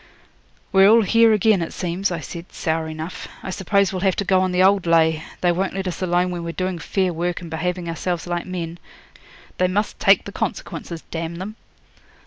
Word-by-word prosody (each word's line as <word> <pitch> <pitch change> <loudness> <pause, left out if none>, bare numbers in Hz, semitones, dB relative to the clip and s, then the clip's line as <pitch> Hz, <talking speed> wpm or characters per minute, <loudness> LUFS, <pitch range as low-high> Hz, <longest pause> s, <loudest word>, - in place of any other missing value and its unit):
'We're 195 0 +6
all 230 +1 +7
here 230 +3 +5
again, 215 -2 +3
it 165 - -4
seems,' 180 +3 -1
I 170 -3 -3
said, 170 +1 -8
sour 160 -1 -1
enough. 160 +2 -6 0.2
'I 190 - -4
suppose 200 0 +1
we'll 185 - -2
have 190 0 +2
to 200 - -2
go 185 0 +3
on 185 0 +1
the 180 +1 +3
old 195 -2 +4
lay; 160 -1 +4 0.2
they 175 - +3
won't 190 +2 -1
let 195 -1 -2
us 180 - -4
alone 180 0 +1
when 175 -1 -4
we're 170 0 -4
doing 185 -1 -2
fair 185 +1 0
work 175 +1 -2
and 170 -2 -9
behaving 180 +2 -2
ourselves 170 +1 -2
like 175 0 -3
men. 170 -2 -5 0.8
They 185 - +4
must 205 +4 -1
take - - +5
the - - -6
consequences, 170 - -4
d 165 - -3
n 165 0 -4
them!' 200 +4 -6
180 Hz, 210 wpm, -22 LUFS, 170-190 Hz, 0.8 s, all